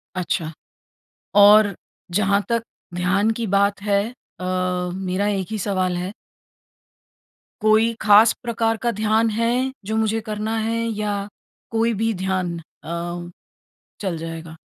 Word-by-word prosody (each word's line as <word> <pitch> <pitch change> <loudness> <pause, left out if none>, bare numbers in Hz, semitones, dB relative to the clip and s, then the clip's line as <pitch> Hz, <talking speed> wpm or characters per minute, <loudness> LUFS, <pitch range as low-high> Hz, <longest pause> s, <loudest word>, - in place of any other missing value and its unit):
अच्छा। 175 -3 -2 0.8
और 205 0 +7 0.4
जहाँ 200 +1 +2
तक 230 -1 +1 0.3
ध्यान 185 +5 +2
की 230 -2 -2
बात 200 +1 +2
है 200 -1 +2 0.4
अ, 180 - -5 0.5
मेरा 190 +2 -1
1 195 -3 -1
ही 220 - -1
सवाल 185 -2 0
है। 180 +3 -4 1.5
कोई 220 +2 +4
ख़ास 215 +2 +7
प्रकार 225 -1 0
का 240 - +2
ध्यान 220 +1 +3
है 230 +2 +1 0.3
जो 220 - -2
मुझे 220 0 +1
करना 215 +1 -2
है 225 +1 -1 0.2
या 210 -1 -1 0.6
कोई 230 +1 +2
भी 225 0 +2
ध्यान 185 -3 -1
अ, 175 +2 -6 0.7
चल 190 -4 -2
जाएगा? 165 0 -7
205 Hz, 125 wpm, -22 LUFS, 185-220 Hz, 1.5 s, और